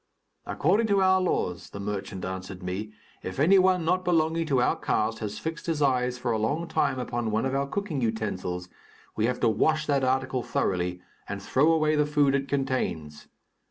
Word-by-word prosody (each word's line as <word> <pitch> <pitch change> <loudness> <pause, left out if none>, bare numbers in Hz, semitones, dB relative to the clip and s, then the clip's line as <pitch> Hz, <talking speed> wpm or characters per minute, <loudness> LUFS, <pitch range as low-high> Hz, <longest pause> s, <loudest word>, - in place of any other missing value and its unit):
"According 205 +9 +2
to 200 -2 +3
our 190 0 +4
laws," 90 - -1
the 100 - -8
merchant 100 -2 -4
answered 95 0 -6
me, 95 +4 -4 0.3
"if 95 - -6
any 185 +7 +6
one 185 -2 +3
not 180 +2 +1
belonging 165 -1 +1
to 135 -4 +2
our 125 - +2
caste 110 +1 -1
has 105 -1 -4
fixed 165 +1 -5
his 165 -3 0
eyes 125 -3 +1
for 120 -1 -2
a 110 - 0
long 145 +10 -1
time 135 -4 0
upon 120 -2 -2
one 110 +3 0
of 130 - -1
our 140 0 0
cooking 170 -3 -3
utensils, 95 -6 -2 0.5
we 110 +1 +1
have 125 0 -2
to - - +4
wash 155 +8 +2
that 140 -3 +1
article 130 0 0
thoroughly, 90 -4 -1 0.3
and 100 0 -4
throw 135 +10 +2
away 155 -1 +2
the 150 -1 +2
food 145 -2 +3
it 140 0 0
contains. 130 - -2
130 Hz, 195 wpm, -27 LUFS, 105-155 Hz, 0.5 s, any